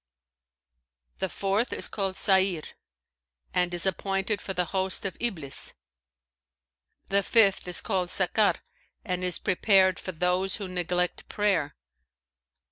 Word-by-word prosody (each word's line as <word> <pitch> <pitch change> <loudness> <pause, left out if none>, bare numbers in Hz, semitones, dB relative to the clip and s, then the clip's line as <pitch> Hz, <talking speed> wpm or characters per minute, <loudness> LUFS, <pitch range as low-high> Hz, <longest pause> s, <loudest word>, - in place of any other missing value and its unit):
[FN#526] 60 0 -53
The - - -1
fourth 200 +5 -1
is - - 0
called 195 -2 -3
Sa'νr 190 -5 +3 0.9
and 180 -1 +1
is 175 0 -1
appointed 195 +2 -1
for 190 - -5
the 180 - +1
host 190 +1 0
of 190 - -3
Iblis. 170 - -2 1.3
The 200 +1 +3
fifth 200 -3 +3
is 180 - 0
called 185 -4 -1
Sakar 195 +4 +3 0.5
and 180 -3 -2
is 180 -1 +1
prepared 190 -1 +3
for 185 - -5
those 180 +3 0
who 200 - -5
neglect 180 0 -2
prayer. 190 -8 0
185 Hz, 125 wpm, -27 LUFS, 165-195 Hz, 1.3 s, Sa'νr